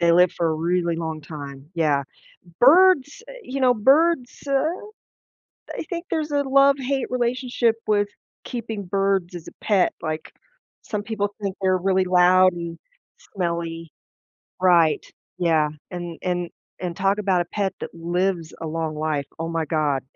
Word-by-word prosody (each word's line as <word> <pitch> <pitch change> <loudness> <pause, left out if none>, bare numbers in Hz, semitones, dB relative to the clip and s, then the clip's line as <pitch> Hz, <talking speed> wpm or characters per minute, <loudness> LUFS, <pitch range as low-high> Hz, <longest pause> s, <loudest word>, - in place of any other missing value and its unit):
they 170 0 +4
live 180 +1 +5
for 170 - -1
a 160 - 0
really 170 +1 0
long 160 -1 -4
time, 145 -2 -9
yeah. 150 -4 +2 0.6
Birds, 315 - +5
eh, - - -8
you 270 -5 -5
know, 255 -1 +4
birds, 270 +4 +3
uh, 275 - -2 1.3
I - - -3
think 345 -1 -4
there's 315 -3 -2
a 285 -1 +1
love-hate 275 -1 +2
relationship 245 -1 0
with 205 -1 +2 0.4
keeping 225 -4 -5
birds 195 -1 0
as 170 -1 -8
a - - -8
pet, 200 -4 +2
like 155 -1 -4 0.5
some 210 -2 -4
people 205 -2 -2
think 195 -2 -3
they're 185 -1 +3
really 190 0 +1
loud 185 0 +5
and 170 -1 -6 0.6
smelly. 170 -3 -3 0.7
Right, 170 -4 +4 0.3
yeah, 160 -4 +2 0.2
and 175 -2 -6
and 175 -1 -2 0.3
and 175 -2 -4
talk 195 +1 +1
about 190 -3 +2
a - - -9
pet 200 0 -2
that - - -7
lives 170 0 -1
a 165 - -4
long 160 0 -3
life, 150 -2 -1
oh 165 +1 -3
my 165 -1 -1
god, 150 -4 0
180 Hz, 155 wpm, -23 LUFS, 165-230 Hz, 1.3 s, live